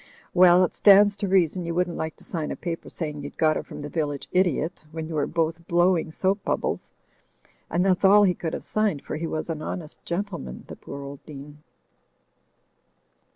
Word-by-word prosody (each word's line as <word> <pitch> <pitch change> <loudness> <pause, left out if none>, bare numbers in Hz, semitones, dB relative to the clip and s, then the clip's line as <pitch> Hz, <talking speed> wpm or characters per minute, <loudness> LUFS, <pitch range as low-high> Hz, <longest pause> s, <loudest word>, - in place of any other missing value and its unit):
Well, 180 0 +7
it 180 - 0
stands 205 0 +6
to 200 - -2
reason, 185 -2 +2
you 170 0 -3
wouldn't 180 -1 0
like 160 0 -4
to - - -15
sign 160 -3 -4
a - - -3
paper 170 -2 -5
saying 150 -3 -5
you'd 145 - -9
got 155 -1 +3
it - - -4
from - - -8
the 145 - -5
village 145 -2 -3
idiot 175 -2 0
when 160 0 -5
you 165 - -6
were 150 -2 0
both 165 0 -2
blowing 175 -1 +2
soap 195 +5 0
bubbles; - - -2 0.8
and 180 +2 +1
that's 185 -1 +2
all 205 +2 +7
he 185 -3 +4
could 165 -1 -4
have - - -5
signed, 210 -9 0
for - - -5
he 165 +2 -3
was 155 -1 -3
an 160 -2 -4
honest 155 -1 -6
gentle 195 +3 -3
man, 65 -1 -8
the - - -9
poor 140 0 -9
old 140 0 -9
Dean. 145 0 -10
165 Hz, 200 wpm, -25 LUFS, 155-185 Hz, 0.8 s, Well